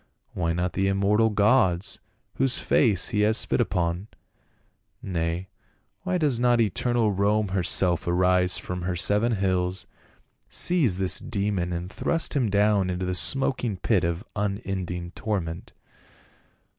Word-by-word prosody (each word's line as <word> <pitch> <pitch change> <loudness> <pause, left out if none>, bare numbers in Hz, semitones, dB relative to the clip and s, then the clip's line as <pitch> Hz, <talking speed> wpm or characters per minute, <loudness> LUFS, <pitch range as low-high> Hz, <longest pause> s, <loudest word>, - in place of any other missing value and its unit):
Why 85 -2 -1
not 90 +2 -2
the 95 0 0
immortal 100 +3 +2
gods, 100 -4 +1 0.3
whose 135 -1 +1
faces 105 -9 +1
he 105 - -1
has 110 +1 +3
spit - - +2
upon? 85 +1 -2 0.9
Nay, 85 0 -3 0.5
why 185 -1 -1
does 145 -8 0
not 120 -1 +3
eternal 115 +2 +1
Rome 100 +1 +1
herself 90 -2 +2
arise 90 +1 +2
from 90 0 -6
her 90 0 -2
seven 105 +7 +1
hills, 95 -2 -1 0.6
seize 150 - +2
this 95 -1 +3
demon 100 -4 -2
and 90 +2 -5
thrust 165 -1 -1
him 125 -6 +1
down 100 -1 +2
into 90 0 -3
the 90 - -2
smoking 120 +2 +1
pit 95 +1 +1
of 85 +3 -2
unending 95 -4 -4
torment?" 90 -6 -4
95 Hz, 130 wpm, -25 LUFS, 90-110 Hz, 0.9 s, has